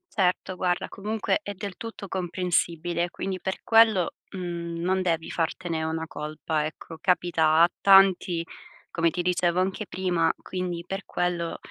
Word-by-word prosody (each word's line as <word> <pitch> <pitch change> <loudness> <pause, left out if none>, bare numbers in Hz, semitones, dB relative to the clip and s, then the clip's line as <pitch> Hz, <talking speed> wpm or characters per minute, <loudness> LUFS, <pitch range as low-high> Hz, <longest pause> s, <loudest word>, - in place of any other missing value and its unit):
Certo, 185 -1 +1
guarda, 180 -1 0
comunque 215 +8 -1
è 205 - -5
del 200 0 -6
tutto 225 -3 -7
comprensibile. 175 -2 -1
Quindi 190 +1 -4
per 190 - -3
quello, 220 -6 +5 0.2
mhmm, 170 -2 -5
non 185 +2 +1
devi 165 -3 -1
fartene 165 -1 -2
una 160 0 -2
colpa, 155 0 -3
ecco, 160 +1 -10
capita 165 -3 +3
a 170 - +5
tanti, 195 -3 +5 0.5
come 170 -1 +2
ti 175 +2 -3
dicevo 180 0 +1
anche 190 +3 -1
prima, 175 -3 +1
quindi 180 -2 -4
per 195 +2 -4
quello, 175 -1 -2
175 Hz, 145 wpm, -26 LUFS, 170-190 Hz, 0.5 s, quello